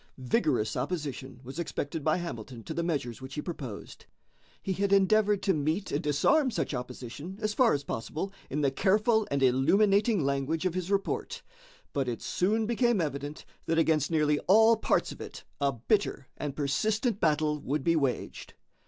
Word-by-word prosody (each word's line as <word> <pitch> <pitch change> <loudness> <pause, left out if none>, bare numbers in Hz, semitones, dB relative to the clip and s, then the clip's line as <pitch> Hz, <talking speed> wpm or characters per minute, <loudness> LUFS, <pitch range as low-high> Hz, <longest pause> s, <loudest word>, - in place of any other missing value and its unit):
Vigorous 130 - 0
opposition 135 -3 -4
was 130 +6 -8
expected 160 -2 -3
by 155 +2 +2
Hamilton 125 -8 -6
to 160 - -5
the 170 - -1
measures 140 -8 -2
which 130 +1 -8
he 150 - -2
proposed. 135 - -7 0.5
He 190 - -2
had 195 +1 -1
endeavored 205 +1 +4
to 195 - +3
meet 155 +6 -1
and 145 - 0
disarm 260 - +3
such 225 - -2
opposition 125 +7 -6
as 215 -1 -1
far 245 0 +4
as 145 - -1
possible 155 +11 -4 0.2
in 150 +3 -1
the 140 -2 +2
careful 215 - +2
and 140 -1 0
illuminating 195 - +3
language 140 +5 -1
of 185 - +1
his 185 0 -3
report, 200 0 -2 0.5
but 135 -2 0
it 120 -2 -4
soon 215 +5 +1
became 235 -1 +2
evident 145 -2 -4 0.2
that 165 - +1
against 160 -3 +2
nearly 150 -2 +2
all 220 +4 +7
parts 220 - 0
of - - -10
it - - -8 0.2
a 140 -1 +2
bitter 135 - 0
and 145 -2 -4
persistent 205 - 0
battle 150 -2 +1
would 145 0 -2
be 165 +2 +3
waged. 140 -5 -2
155 Hz, 170 wpm, -29 LUFS, 140-200 Hz, 0.5 s, all